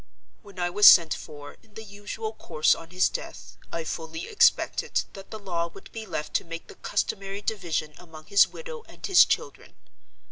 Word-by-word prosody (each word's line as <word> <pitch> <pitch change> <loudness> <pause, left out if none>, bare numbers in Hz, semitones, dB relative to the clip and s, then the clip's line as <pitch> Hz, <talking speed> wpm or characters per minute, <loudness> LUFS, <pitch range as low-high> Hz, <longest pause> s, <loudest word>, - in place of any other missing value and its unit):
When 200 -2 -16
I 175 -1 -1
was 210 +3 +7
sent 165 -3 +8
for, 145 -1 -10
in 215 -2 -27
the 220 - -8
usual 205 +2 -7
course, 155 -7 +1
on 165 0 -9
his 180 +1 +2
death, - - -8 0.2
I 165 - -3
fully 160 +1 -6
expected 430 - +2
that 195 0 -11
the 220 - -7
law 175 -5 -3
would 195 - -14
be 225 -1 -7
left 150 -4 -5
to - - -8
make 165 0 -8
the - - -13
customary 195 0 -3
division 165 -8 -2
among 160 -3 -13
his 200 +2 +5
widow 485 -1 -9
and - - -10
his 385 -3 +7
children. - - -4
185 Hz, 185 wpm, -26 LUFS, 165-210 Hz, 0.2 s, sent